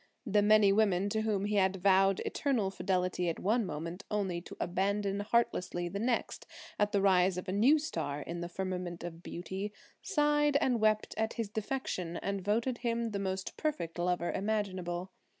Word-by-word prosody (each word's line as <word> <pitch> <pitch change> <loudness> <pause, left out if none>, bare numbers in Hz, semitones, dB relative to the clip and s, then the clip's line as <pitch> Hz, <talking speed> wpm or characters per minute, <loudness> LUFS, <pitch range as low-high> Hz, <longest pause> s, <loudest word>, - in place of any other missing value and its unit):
The 210 -2 +3
many 210 -1 +5
women 200 -2 +2
to 220 +2 0
whom 210 -3 0
he 210 0 0
had 190 -1 +3
vowed 195 0 +3
eternal 235 -9 0
fidelity 180 -2 0
at 165 - -3
one 215 +2 +1
moment, 165 +4 -5
only 190 -5 -1
to - - -11
abandon 195 +2 0
heartlessly 205 -5 0
the 200 +3 -4
next 235 +2 -1 0.3
at 210 0 +2
the 200 -2 +1
rise 185 -1 +4
of 180 - -5
a - - -1
new 235 +10 +5
star 150 - -3
in 170 +3 -5
the 175 - -4
firmament 180 -2 -4
of 170 -1 -7
beauty, 190 +4 -5 0.3
sighed 295 -4 +2
and 250 -4 +1
wept 215 0 +2
at 220 +1 0
his 230 -4 -3
defection 205 -6 -3
and 200 -1 -3
voted 230 +5 0
him 235 -1 -1
the 200 - -2
most 190 -1 -3
perfect 290 - -2
lover 175 0 0
imaginable. 190 -3 -2
195 Hz, 175 wpm, -32 LUFS, 180-220 Hz, 0.3 s, many